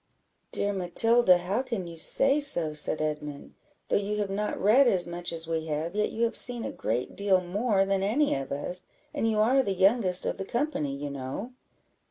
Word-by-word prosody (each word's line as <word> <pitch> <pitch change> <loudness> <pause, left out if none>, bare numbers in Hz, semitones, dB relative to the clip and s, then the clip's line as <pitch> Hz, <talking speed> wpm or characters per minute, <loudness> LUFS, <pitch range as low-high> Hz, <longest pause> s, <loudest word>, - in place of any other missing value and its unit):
"Dear 205 0 -1
Matilda, 195 +2 +3
how 190 +7 -2
can 230 -8 -5
you 170 -1 -9
say 275 - +2
so?" 170 - +5
said 150 0 +3
Edmund; 150 -1 -6 0.3
"though - - +1
you 205 +1 -3
have 205 -2 -2
not 210 +2 -3
read 245 +7 +4
as 185 -6 +2
much 175 0 -4
as 165 -1 -1
we 160 -1 -3
have, 155 +3 -3
yet 210 0 -1
you 230 - -2
have 230 - 0
seen 240 -2 0
a - - -4
great 120 +3 -4
deal 200 -2 +2
more 195 +3 0
than 195 0 -1
any 245 +10 +1
of 135 0 -5
us, 160 +6 -4 0.3
and 225 - -1
you 220 - -1
are 245 +6 +3
the 200 -7 -3
youngest 190 -1 +2
of - - -3
the 195 - -4
company, 235 - -2
you 145 +1 -6
know. 140 - -6
195 Hz, 205 wpm, -27 LUFS, 165-225 Hz, 0.3 s, so